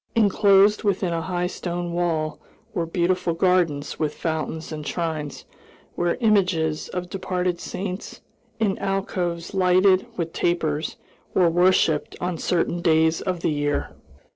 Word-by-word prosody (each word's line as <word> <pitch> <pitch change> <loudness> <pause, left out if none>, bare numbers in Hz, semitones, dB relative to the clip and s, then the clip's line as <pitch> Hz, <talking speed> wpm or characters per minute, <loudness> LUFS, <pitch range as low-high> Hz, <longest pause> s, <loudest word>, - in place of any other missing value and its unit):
Inclosed 205 -1 +4
within 190 -4 0
a 165 - -1
high 180 +1 -2
stone 175 -1 -4
wall 160 -3 -1 0.3
were 170 -5 -1
beautiful 175 0 0
gardens 165 -5 +1
with 150 -1 -1
fountains 160 0 -3
and 150 -1 -6
shrines, 160 -4 -3 0.5
where 175 0 0
images 180 -8 +2
of 180 -1 -4
departed 180 -1 -2
saints, 185 +1 -5 0.4
in 205 -3 +1
alcoves 185 -3 -2
lighted 185 0 +4
with 165 -2 -3
tapers 160 -3 0 0.4
were 175 -3 +4
worshiped 175 -3 +3
on 175 -2 -2
certain 175 0 0
days 160 -1 +3
of 180 -3 -2
the - - +1
year. 145 -1 -1
175 Hz, 130 wpm, -24 LUFS, 160-185 Hz, 0.5 s, Inclosed